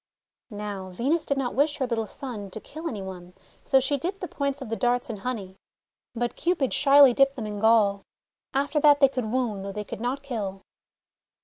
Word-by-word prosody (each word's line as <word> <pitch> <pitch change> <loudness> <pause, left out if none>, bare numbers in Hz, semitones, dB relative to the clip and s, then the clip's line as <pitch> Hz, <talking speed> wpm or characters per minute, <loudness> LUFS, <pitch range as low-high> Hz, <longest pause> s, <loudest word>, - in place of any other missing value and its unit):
Now, 205 -3 -6
Venus 275 - -1
did 280 - 0
not 260 -3 -1
wish 290 +3 +2
her 265 - 0
little 225 -3 -2
son 230 -8 -7
to 220 - -7
kill 315 +8 -8
any 205 -4 -5
one, 180 -1 -9 0.3
so 270 - +4
she 270 +2 0
dipped 370 +7 -3
the 360 - -4
points 280 -2 -2
of 265 - -7
the 225 - -1
darts 245 0 0
in 215 - -6
honey. 195 -4 -5 0.6
But 240 +1 -2
Cupid 325 -6 0
shyly 280 -2 +7
dipped 275 +2 +3
them 235 -5 -5
in 210 -1 -5
gall. 210 -2 +4 0.5
After 285 +3 0
that 290 -1 +6
they 275 - +6
could 255 -3 -3
wound 230 -6 -1
though 200 - -5
they 210 +1 -4
could 210 - -8
not 260 +4 -2
kill. 205 -8 -4
245 Hz, 205 wpm, -26 LUFS, 210-280 Hz, 0.6 s, shyly